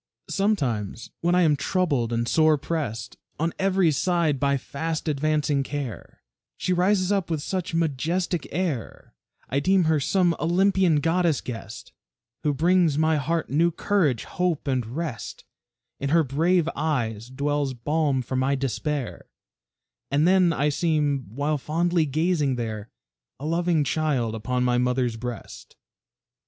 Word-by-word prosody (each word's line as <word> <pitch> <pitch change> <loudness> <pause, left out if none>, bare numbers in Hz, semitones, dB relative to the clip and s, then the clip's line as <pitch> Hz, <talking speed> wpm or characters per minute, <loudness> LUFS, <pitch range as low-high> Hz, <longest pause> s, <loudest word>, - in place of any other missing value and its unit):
Sometimes 125 - -1
when 175 +1 +2
I 180 - +4
am 155 -3 +4
troubled 140 -6 0
and 115 0 -1
sore 155 +3 +4
pressed 135 -8 -4 0.2
On 165 +1 0
every 190 -3 +3
side 165 -1 +1
by 140 0 +2
fast 160 +5 -4
advancing 150 -1 +1
care, 135 -4 -6 0.3
She 185 - 0
rises 185 +1 +2
up 195 -4 0
with 155 -3 -2
such 185 -3 -3
majestic 165 +3 -1
air, 160 -8 -3 0.3
I 140 - 0
deem 185 +5 +3
her 160 -1 +2
some 175 +3 +2
Olympian 180 -2 +3
goddess 165 -1 +2
guest, 115 -3 -8 0.5
Who 150 - +1
brings 165 +1 +3
my 160 0 +3
heart 160 +3 -1
new 165 +5 +3
courage, 165 - 0
hope, 180 -5 -2
and 130 -2 +1
rest; 135 -1 -5 0.5
In 140 - -2
her 165 +2 +4
brave 165 +5 +2
eyes 120 -7 -2
dwells 140 0 -1
balm 145 +1 0
for 130 - -5
my 130 +2 +1
despair, 135 0 -3 0.8
And 145 +4 +2
then 185 -2 +4
I 150 -2 +1
seem, 145 -4 0
while 145 +6 -1
fondly 165 +2 +1
gazing 150 -2 +1
there, 110 -2 -4 0.5
A 145 - -6
loving 170 -1 +1
child 140 -6 0
upon 125 +3 -1
my 125 -1 +2
mother's 125 -1 0
breast. 120 +1 -8
150 Hz, 140 wpm, -25 LUFS, 130-170 Hz, 0.8 s, I